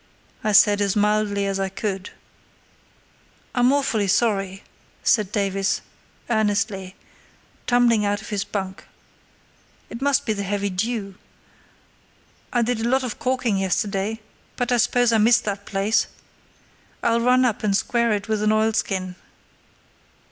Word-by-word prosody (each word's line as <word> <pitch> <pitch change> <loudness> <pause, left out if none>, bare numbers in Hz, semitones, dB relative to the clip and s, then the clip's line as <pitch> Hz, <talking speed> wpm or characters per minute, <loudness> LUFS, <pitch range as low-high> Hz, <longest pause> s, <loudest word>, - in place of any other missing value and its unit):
I 215 - +1
said, 205 +1 +6
as 200 -2 +1
mildly 210 -1 +1
as 195 0 -2
I 195 0 -1
could. 195 0 -4 1.4
"I'm 245 +1 +3
awfully 255 -8 +1
sorry," 195 -2 0 0.4
said 210 -4 +2
Davies, 195 -1 0 0.5
earnestly, 205 -4 -1 0.7
tumbling 240 -3 +3
out 205 0 0
of 200 - -10
his 205 -2 -1
bunk. 190 -2 -5 1.1
"It 235 - -7
must 280 0 +2
be 220 - 0
the 200 - -4
heavy 200 0 -2
dew. 200 0 -3 1.3
I 240 -1 +2
did 240 0 -1
a 230 +1 -1
lot 265 +1 +2
of 245 -4 -5
caulking 250 -5 0
yesterday, 195 +3 -1 0.4
but 245 0 -2
I 245 - +3
suppose 240 +1 +2
I 225 - +4
missed 230 +3 +4
that 200 -1 -4
place. 200 +3 +1 1.0
I'll 230 0 +2
run 250 +2 +4
up 230 -4 0
and 200 -2 +2
square 235 0 0
it 205 0 -3
with 215 -1 -1
an 215 0 +2
oilskin." 215 -4 0
210 Hz, 140 wpm, -23 LUFS, 195-235 Hz, 1.4 s, said